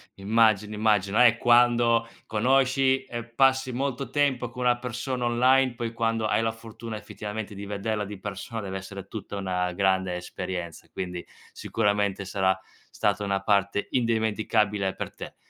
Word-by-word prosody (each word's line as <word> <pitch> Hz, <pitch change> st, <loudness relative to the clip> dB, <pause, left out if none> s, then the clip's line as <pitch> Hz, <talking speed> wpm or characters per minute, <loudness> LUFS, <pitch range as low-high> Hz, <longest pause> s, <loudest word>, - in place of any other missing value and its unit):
Immagino, 105 Hz, 0 st, +2 dB
immagino. 105 Hz, +1 st, +3 dB
Eh, 115 Hz, -2 st, +6 dB
quando 120 Hz, -1 st, +4 dB, 0.2 s
conosci 130 Hz, +3 st, +2 dB
e 120 Hz, -3 st, -5 dB
passi 130 Hz, +2 st, +2 dB
molto 135 Hz, +1 st, -2 dB
tempo 135 Hz, -5 st, +1 dB
con 125 Hz, +1 st, -6 dB
una 125 Hz, 0 st, +3 dB
persona 125 Hz, +1 st, -3 dB
online, 130 Hz, +2 st, +3 dB
poi 115 Hz, -1 st, -4 dB
quando 115 Hz, -1 st, 0 dB
hai 110 Hz, -, +2 dB
la 115 Hz, 0 st, +1 dB
fortuna 115 Hz, 0 st, -8 dB
effettivamente 105 Hz, 0 st, -6 dB
di 100 Hz, +1 st, -7 dB
vederla 105 Hz, +1 st, -2 dB
di 100 Hz, -1 st, -8 dB
persona 105 Hz, +3 st, -5 dB
deve 95 Hz, -1 st, -4 dB
essere 95 Hz, 0 st, -8 dB
tutta 100 Hz, -1 st, -6 dB
una 90 Hz, -2 st, -1 dB
grande 95 Hz, -1 st, +1 dB
esperienza, 90 Hz, -1 st, -6 dB
quindi 90 Hz, -1 st, -5 dB, 0.3 s
sicuramente 100 Hz, -2 st, 0 dB
sarà 95 Hz, -1 st, +1 dB, 0.3 s
stata 105 Hz, 0 st, 0 dB
una 100 Hz, -1 st, 0 dB
parte 100 Hz, 0 st, +1 dB
indimenticabile 110 Hz, -4 st, +1 dB
per -, -, -5 dB
te. -, -, -9 dB
110 Hz, 145 wpm, -26 LUFS, 100-120 Hz, 0.3 s, Eh